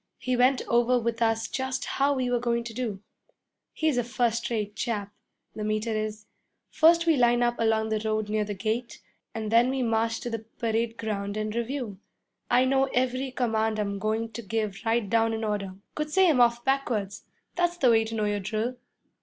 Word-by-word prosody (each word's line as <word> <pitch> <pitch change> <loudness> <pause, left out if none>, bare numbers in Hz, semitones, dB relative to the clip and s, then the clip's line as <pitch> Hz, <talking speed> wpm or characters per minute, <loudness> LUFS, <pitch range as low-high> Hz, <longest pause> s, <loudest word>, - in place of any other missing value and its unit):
He 255 0 -1
went 255 +2 +3
over 240 +1 +3
with 235 0 -2
us 225 0 +1
just 260 0 -3
how 280 +1 +1
we 255 -2 -1
were 245 - +2
goin' 235 -1 0
to 235 -1 -7
do. 220 -5 -4 0.7
He's 310 -6 +1
a - - +1
first 235 -1 0
rate 210 -3 -2
chap 205 -3 -3 0.4
the 215 - -5
Meter 215 +1 -1
is. 215 0 -3 0.5
First 335 +1 +5
we 325 -2 +4
line 240 -1 +3
up 240 0 0
along 220 -1 +2
the 215 -1 0
road 215 -1 -1
near 215 0 0
the 205 0 -4
gate, 220 +5 -3 0.4
and 220 -1 -3
then 235 +2 +5
we 265 -1 0
march 225 0 0
to 240 - -4
the 225 - -2
parade 225 +1 -2
ground 205 -2 -3
and 215 0 -2
review. 235 -3 -3 0.5
I 250 +1 +4
know 270 +1 +3
every 255 +1 0
command 225 -3 0
I'm 200 -1 -2
goin' 220 +2 -1
to 225 - -6
give 215 -2 -3
right 225 -2 +1
down 225 +1 +2
in 220 - -4
order 205 -3 -2 0.2
could 305 0 -3
say 375 +4 +4
'em 290 -7 +4
off 235 0 +3
backwards. 225 -7 -1 0.3
That's 350 0 0
the 255 -7 +4
way 225 -1 +4
to 225 0 -5
know 215 -1 0
your 205 0 0
drill.' 215 +5 -2
230 Hz, 200 wpm, -27 LUFS, 215-250 Hz, 0.7 s, First